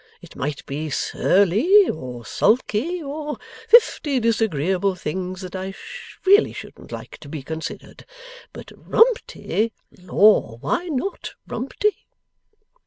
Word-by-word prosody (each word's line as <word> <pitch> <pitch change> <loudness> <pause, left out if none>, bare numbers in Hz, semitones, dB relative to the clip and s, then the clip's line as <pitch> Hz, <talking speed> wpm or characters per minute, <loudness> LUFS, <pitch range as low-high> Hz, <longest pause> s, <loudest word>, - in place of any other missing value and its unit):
It - - -15
might 145 +1 -4
be 150 +3 -4
Surly, 215 - +3
or 125 -5 -6
Sulky, 255 - +1
or 295 +1 -5 0.3
fifty 300 - +4
disagreeable 195 - +1
things 185 +2 -4
that 185 0 -8
I 190 +1 -5 0.5
really 405 +3 +5
shouldn't - - -11
like - - -8
to 145 - -12
be 145 -2 -6
considered. 160 +3 -7 0.4
But - - -11
Rumty! 445 - +1 0.2
Lor, 185 - +3
why 350 - -2
not 320 +5 -4
Rumty? 270 - -1
205 Hz, 110 wpm, -22 LUFS, -, 0.5 s, really